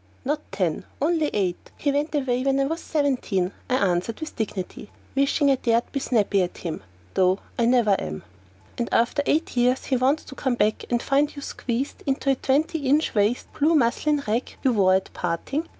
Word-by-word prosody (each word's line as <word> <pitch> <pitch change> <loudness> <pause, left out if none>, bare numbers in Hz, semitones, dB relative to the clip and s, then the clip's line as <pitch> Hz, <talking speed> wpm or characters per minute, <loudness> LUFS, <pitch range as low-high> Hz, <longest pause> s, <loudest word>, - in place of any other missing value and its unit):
"Not 295 +3 0
ten, 175 -5 -1 0.2
only 315 +1 +2
eight! 185 -4 -2
He 285 - 0
went 290 +2 -1
away 255 -3 0
when 275 0 +2
I 275 - +3
was 325 +4 -3
seventeen," 250 - 0 0.2
I 255 - +2
answered 195 -1 0
with 315 -1 -6
dignity, 205 -1 -4 0.2
wishing 275 +1 +3
I 270 - +3
dared 235 -1 +1
be 275 - -1
snappy 210 -6 +2
at 180 - -3
him: 165 -3 -5 0.3
though 185 0 +3 0.2
I 235 - +3
never 240 -3 +4
am. 75 0 -5 0.6
"And 235 - -1
after 235 +5 +2
eight 320 -1 +1
years 250 +1 +2
he 260 - +1
wants 270 +5 +2
to - - -10
come 260 -2 -1
back 215 -1 +1
and 240 -1 0
find 285 +2 +1
you 285 - -7
squeezed 255 +2 -3
into 275 0 +1
a - - +2
twenty 305 +6 +1
inch 295 +4 +2
waist, 210 +3 0
blue 315 +3 +3
muslin 290 +3 +2
rag 225 +4 -2
you 260 - +3
wore 190 -3 +4
at 190 - -2
parting? 220 - -2
255 Hz, 195 wpm, -24 LUFS, 210-285 Hz, 0.6 s, never